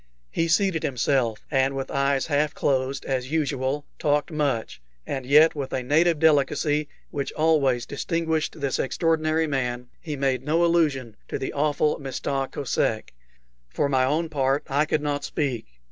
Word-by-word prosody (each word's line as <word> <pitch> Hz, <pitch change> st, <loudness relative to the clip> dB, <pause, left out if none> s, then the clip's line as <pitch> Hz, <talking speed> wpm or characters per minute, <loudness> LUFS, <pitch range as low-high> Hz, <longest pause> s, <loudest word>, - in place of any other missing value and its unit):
He 165 Hz, -, 0 dB
seated 165 Hz, 0 st, +2 dB
himself, 125 Hz, -3 st, 0 dB
and 135 Hz, -1 st, +2 dB
with 135 Hz, -1 st, -4 dB
eyes 140 Hz, 0 st, +1 dB
half 150 Hz, 0 st, 0 dB
closed, 135 Hz, 0 st, 0 dB
as 130 Hz, -1 st, -2 dB
usual, 145 Hz, -2 st, -1 dB
talked 145 Hz, +2 st, +1 dB
much; 140 Hz, -, -2 dB, 0.2 s
and 130 Hz, -2 st, -4 dB
yet, 150 Hz, +4 st, +6 dB
with 140 Hz, -3 st, -5 dB
a 130 Hz, -, -1 dB
native 160 Hz, +5 st, +3 dB
delicacy 150 Hz, 0 st, +2 dB, 0.2 s
which 140 Hz, -1 st, -3 dB
always 140 Hz, -6 st, +2 dB
distinguished 160 Hz, +1 st, -2 dB
this 140 Hz, -2 st, -1 dB
extraordinary 160 Hz, +2 st, +1 dB
man, 125 Hz, -4 st, -2 dB
he 155 Hz, -4 st, -5 dB
made 135 Hz, -2 st, 0 dB
no 165 Hz, +4 st, +2 dB
allusion 145 Hz, -10 st, +1 dB
to -, -, -3 dB
the 130 Hz, -, -4 dB
awful 150 Hz, +1 st, +1 dB
Mista 135 Hz, 0 st, -3 dB
Kosek. 115 Hz, -, -1 dB, 0.6 s
For 140 Hz, -, 0 dB
my 130 Hz, -2 st, +2 dB
own 155 Hz, +5 st, +1 dB
part, 135 Hz, -1 st, +1 dB
I 145 Hz, +2 st, +2 dB
could 150 Hz, 0 st, -1 dB
not 145 Hz, -1 st, -1 dB
speak. 135 Hz, -, -2 dB
145 Hz, 155 wpm, -25 LUFS, 130-155 Hz, 0.6 s, yet